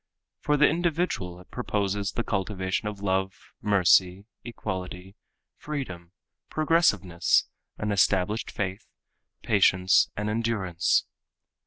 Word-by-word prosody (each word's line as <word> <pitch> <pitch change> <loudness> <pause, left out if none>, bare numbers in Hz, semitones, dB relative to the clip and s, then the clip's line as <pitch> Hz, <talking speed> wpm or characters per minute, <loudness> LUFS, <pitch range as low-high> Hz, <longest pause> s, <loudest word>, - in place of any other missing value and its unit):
For 150 0 +1
the 145 - +6
individual 165 - -1
it 90 - -20
proposes 100 -4 -2
the 120 - -2
cultivation 95 0 -2
of 100 -1 -6
love, 95 0 0 0.3
mercy, 95 -1 +3 0.2
equality, 95 -4 -6 0.4
freedom, 90 - -6 0.4
progressiveness, 155 - +2 0.3
an 105 -1 -2
established 100 +2 +1
faith, 95 +2 -4 0.6
patience 95 -3 +4
and 105 +1 -2
endurance. 105 -6 0
100 Hz, 100 wpm, -26 LUFS, 95-115 Hz, 0.6 s, the